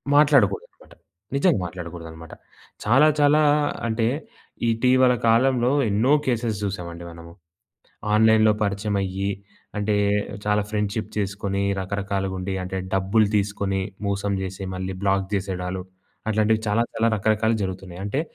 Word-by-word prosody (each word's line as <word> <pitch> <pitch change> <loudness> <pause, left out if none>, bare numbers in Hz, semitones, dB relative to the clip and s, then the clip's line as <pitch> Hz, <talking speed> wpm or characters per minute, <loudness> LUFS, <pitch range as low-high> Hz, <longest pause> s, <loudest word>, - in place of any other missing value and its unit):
మాట్లాడకూడదనమాట. 140 -10 +2 0.4
నిజంగా 150 - +3
మాట్లాడకూడదనమాట. 85 -2 -8 0.5
చాలా 135 +8 +5
చాలా 145 +1 +5 0.5
అంటే 110 0 0 0.7
ఇటీవల 125 +2 +4
కాలంలో 125 +2 +3 0.2
ఎన్నో 110 +7 +2
కేసెస్ 115 -4 0
చూసామండి 85 -4 -5
మనము. 85 0 -12 0.8
ఆన్‌లైన్‌లో 110 0 +5
పరిచయమయ్యి 100 -1 -1 0.5
అంటే 105 0 +1 0.5
చాలా 105 0 +2
ఫ్రెండ్‌షిప్ 105 0 -2
చేసుకొని 100 -1 -2 0.2
రకరకాలుగుండి 95 -1 -3
అంటే 90 +1 -5 0.2
డబ్బులు 95 +3 +3
తీసుకొని, 100 -1 -1 0.3
మోసం 100 0 -1
చేసి 95 +1 -6
మళ్ళీ 95 +1 -4
బ్లాక్ 95 -1 +1
చేసేడాళ్ళు. 95 -1 -3 0.5
అట్లాంటివి 110 +1 +2
చాలా 105 +3 +2
చాలా 115 - +1
రకరకాలు 110 +2 +1
జరుగుతున్నాయి. 95 -1 -6
అంటే 115 +8 -1
100 Hz, 110 wpm, -23 LUFS, 95-110 Hz, 0.8 s, చాలా